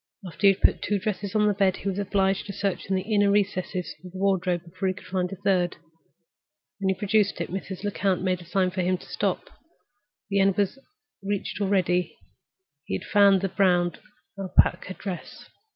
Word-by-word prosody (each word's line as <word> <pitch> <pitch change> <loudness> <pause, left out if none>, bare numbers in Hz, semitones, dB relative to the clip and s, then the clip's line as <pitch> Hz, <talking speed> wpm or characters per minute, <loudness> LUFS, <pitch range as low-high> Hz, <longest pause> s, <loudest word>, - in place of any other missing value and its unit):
After 185 +3 +1
he 195 - +7
had 190 - -15
put - - +4
two 205 - 0
dresses 200 +1 -3
on 210 -1 +4
the 210 - +3
bed, 195 -2 +2
he - - -6
was 195 0 -1
obliged 195 -1 0
to 200 - -5
search 195 -1 -2
in 190 - 0
the 185 - -1
inner 205 -1 +4
recesses 190 -3 0
of 180 - -10
the - - -7
wardrobe 185 -3 +1
before 185 +3 -4
he 185 - 0
could - - -13
find 180 -1 -2
a - - -4
third. 180 -2 +1 1.0
When 195 -1 0
he 190 - 0
produced 205 -1 +1
it, 170 - -4
Mrs. 190 0 -5
Lecount 195 -3 0
made 185 -1 0
a - - -12
sign 185 +1 +1
to 185 0 -2
him 185 +1 +1
to - - -14
stop. - - -2 0.8
The 200 - +2
end 195 -1 +3
was 205 +6 0 0.4
reached 200 +1 -3
already; 185 -3 +1 0.7
he 95 - -2
had - - -5
found 200 -2 +5
the 195 - -1
brown 180 -2 +3 0.5
Alpaca 185 0 +2
dress. 190 -4 -7
190 Hz, 200 wpm, -26 LUFS, 185-200 Hz, 1.0 s, he